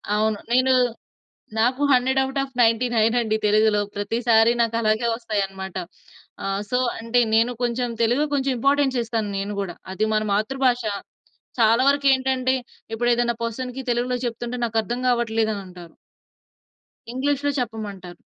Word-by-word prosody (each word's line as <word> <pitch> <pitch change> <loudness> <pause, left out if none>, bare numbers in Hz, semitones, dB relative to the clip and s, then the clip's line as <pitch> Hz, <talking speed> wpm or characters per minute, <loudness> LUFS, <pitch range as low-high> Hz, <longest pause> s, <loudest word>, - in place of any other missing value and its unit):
అవును. 215 0 +1
నేను, 255 +1 +4 0.9
నాకు 255 +5 +1
100 260 +1 +3
ఔట్ 270 +1 -4
ఆఫ్ 270 -1 -6
99 230 0 +2
అండి 220 -2 0
తెలుగులో. 215 0 +3 0.2
ప్రతిసారి 225 +2 +3
నాకలాగే 230 0 +1
వస్తాయనమాట. 195 -5 -4 0.7
ఆహ్, 195 0 -1
సో 250 - +2 0.2
అంటే 230 +2 +1
నేను 230 +2 +3
కొంచెం 245 0 0
తెలుగు 245 +6 +2
కొంచెం 275 -1 0
ఇంపార్టెన్స్ 275 0 +2
ఇస్తాను 225 -3 -2
నేను 200 +1 -3
గూడా. 180 -4 -4 0.2
అది 205 +3 0
మన 215 - +2
మాతృభాషా. 240 0 0 0.7
చాలా 230 +3 +5
వరకేంటంటే 265 -2 +2 0.4
ఇప్పుడు 240 +2 0
ఏదైనా 235 0 0
పర్సన్‌కి 250 +3 -4
తెలుగులో 245 +1 0
చెప్తుంటే 240 +1 -4
నాకర్థం 225 +2 -2
గావట్లేదని 220 -4 0
అంటారు. 175 -3 -13 1.2
ఇంగ్లీష్‌లో 285 +2 0
చెప్పమంటారు. 205 -7 -6
230 Hz, 125 wpm, -23 LUFS, 215-255 Hz, 1.2 s, చాలా